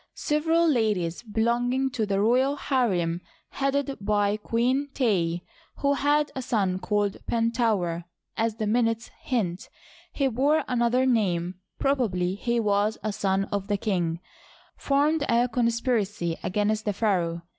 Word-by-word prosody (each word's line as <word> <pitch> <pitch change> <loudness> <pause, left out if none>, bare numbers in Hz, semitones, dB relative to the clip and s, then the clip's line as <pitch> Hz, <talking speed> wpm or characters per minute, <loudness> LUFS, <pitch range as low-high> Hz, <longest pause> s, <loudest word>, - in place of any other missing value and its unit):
Several 325 +3 +2
ladies 210 - +1
belonging 240 +4 0
to 225 -4 -1
the 195 -1 0
royal 255 +6 +3
harem, 185 - 0 0.3
headed 275 0 -1
by 205 0 +2
Queen 245 +6 0
Tey^ 175 -9 +1 0.3
who 280 0 +1
had 290 +1 +1
a 260 - -3
son 200 -7 0
called 205 0 0
Pentaouer 225 -8 0 0.2
— - - -60
as 225 -1 0
the 215 - -2
minutes 225 +1 0
hint, 195 -8 -2 0.4
he 275 - 0
bore 280 +5 +2
another 250 +1 +2
name, 185 -7 0 0.2
probably 205 -10 0
he 235 +4 -1
was 210 0 +1
a 215 -1 -1
son 195 -1 0
of 200 -1 -2
the 205 -1 0
king; 175 -5 -1 0.3
— - - -28
formed 290 +2 +1
a 235 +1 +3
conspiracy 230 -7 0
against 210 +2 0
the 205 - 0
pharaoh. 175 -5 0
225 Hz, 140 wpm, -26 LUFS, 195-255 Hz, 0.4 s, royal